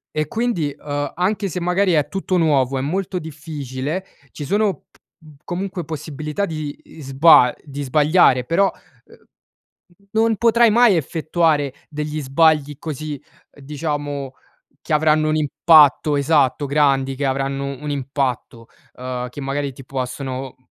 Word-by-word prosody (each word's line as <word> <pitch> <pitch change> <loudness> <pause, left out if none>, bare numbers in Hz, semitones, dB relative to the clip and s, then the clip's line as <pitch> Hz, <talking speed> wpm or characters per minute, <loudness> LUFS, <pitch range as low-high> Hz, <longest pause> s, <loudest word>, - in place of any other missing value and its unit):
E 155 0 0
quindi, 175 - -2
uhm, 145 -1 -4
anche 195 +3 -1
se 180 +1 -4
magari 180 +2 +1
è 150 -3 +2
tutto 190 +2 -2
nuovo, 140 -5 +2
è - - -2
molto 180 +6 -2
difficile, 150 +1 -5 0.3
ci 145 - -7
sono 205 +4 +1 0.2
p - - -28 0.5
comunque 180 0 -4
possibilità 155 +4 -4
di 155 -3 -5
isba 135 -2 +4
di 145 -1 -7
sbagliare, 145 -2 +3
però, 190 +8 +2 0.3
uhm, - - -19 1.0
non 225 0 +2
potrai 235 +1 +4
mai 230 -4 +5
effettuare 155 -2 0 0.2
degli 150 0 -4
sbagli 145 +1 +2
così, 155 -2 -6 0.3
diciamo, 145 -1 -5 0.5
che - - -5
avranno 155 0 +3
un 155 - +1
impatto 150 0 +4
esatto 140 -1 +2
grandi, 135 -2 +2
che 140 +2 -4
avranno 135 +1 -2 0.2
un 150 0 -5
impatto, 130 -4 -3 0.3
uhm, 125 0 -5
che 125 - -9
magari 140 0 -3
ti 130 +1 -13
possono 130 0 -5
150 Hz, 135 wpm, -20 LUFS, 135-165 Hz, 1.0 s, mai